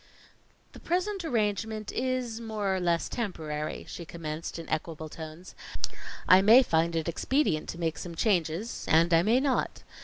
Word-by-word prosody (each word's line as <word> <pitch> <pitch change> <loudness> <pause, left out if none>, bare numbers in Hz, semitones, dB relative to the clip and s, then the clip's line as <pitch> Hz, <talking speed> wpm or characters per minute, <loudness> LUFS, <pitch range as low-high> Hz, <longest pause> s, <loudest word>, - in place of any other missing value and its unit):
"The - - -12
present 370 +2 -1
arrangement 215 - -1
is 250 -3 -2
more 210 -4 -1
or - - -1
less 170 -2 +1
temporary," 155 -9 -4
she 170 - -7
commenced 160 -1 -6
in 165 - -7
equable 155 0 -3
tones. 160 +3 -9 0.7
"I 185 +1 +8
may 225 +6 +8
find 165 -4 +1
it 160 0 -1
expedient 170 - 0
to 170 - -6
make 165 -2 -1
some 170 -2 -6
changes, 180 +2 0
and 165 +2 +4
I 165 - +6
may 225 +7 +3
not. 265 -2 0
180 Hz, 155 wpm, -29 LUFS, 165-230 Hz, 0.7 s, I